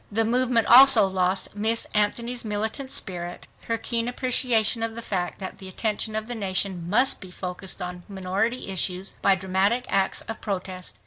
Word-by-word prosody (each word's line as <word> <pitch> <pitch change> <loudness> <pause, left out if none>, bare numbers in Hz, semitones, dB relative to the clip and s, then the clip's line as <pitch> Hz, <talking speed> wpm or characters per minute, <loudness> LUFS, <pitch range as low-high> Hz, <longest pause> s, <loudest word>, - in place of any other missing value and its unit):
The 225 +2 +2
movement 245 0 +2
also 250 -3 +8
lost 190 +1 -1
Miss 220 +2 0
Anthony's 235 +4 0
militant 220 +5 -3
spirit, 175 -6 -4 0.2
her 230 - -1
keen 230 +1 -1
appreciation 245 -3 +2
of 225 0 -2
the 230 - -5
fact 180 -5 -3
that 190 -2 -8
the 190 - -8
attention 215 +3 -2
of 220 0 -2
the 245 - -5
nation 190 -4 -2
must 250 +7 +2
be 190 - -8
focussed 180 +1 -6
on 180 0 -6
minority 195 +5 -2
issues 190 0 -2
by 195 - +4
dramatic 190 +6 0
acts 195 -1 0
of 225 - -8
protest. 185 - -6
205 Hz, 170 wpm, -24 LUFS, 185-230 Hz, 0.2 s, also